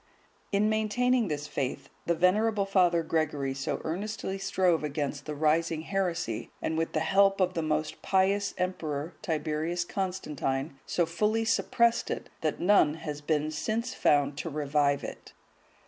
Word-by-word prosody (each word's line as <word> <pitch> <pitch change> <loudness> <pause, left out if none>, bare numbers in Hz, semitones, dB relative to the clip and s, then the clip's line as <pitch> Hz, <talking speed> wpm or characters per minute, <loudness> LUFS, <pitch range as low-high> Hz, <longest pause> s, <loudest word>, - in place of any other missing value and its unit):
(150) 200 - +1
In 210 +1 +3
maintaining 220 +2 +2
this 150 -2 -3
faith, 135 -3 -3 0.2
the 170 - +2
venerable 200 +4 +2
Father 180 -4 +3
Gregory 150 -4 -1
so 135 0 -3
earnestly 195 +3 -3
strove 190 -4 +1
against 145 0 -3
the 150 - -3
rising 160 +2 +1
heresy, 170 - -2
and 160 - -2
with 165 0 -1
the 155 - +1
help 195 +4 +4
of 185 -1 +2
the 165 - -1
most 155 0 -2
pious 195 +1 +1
emperor, 165 -4 -2
Tiberius 160 0 -1
Constantine,(151) 155 -8 -2
so 175 - +1
fully 210 +7 0
suppressed 235 +1 +2
it, - - -4
that 155 -2 -1
none 175 -5 +4
has 150 -2 -6
been 155 0 0
since 225 +10 -2
found 145 0 +2
to 165 - -3
revive 145 -1 +1
it. - - -8
165 Hz, 150 wpm, -29 LUFS, 150-195 Hz, 0.2 s, help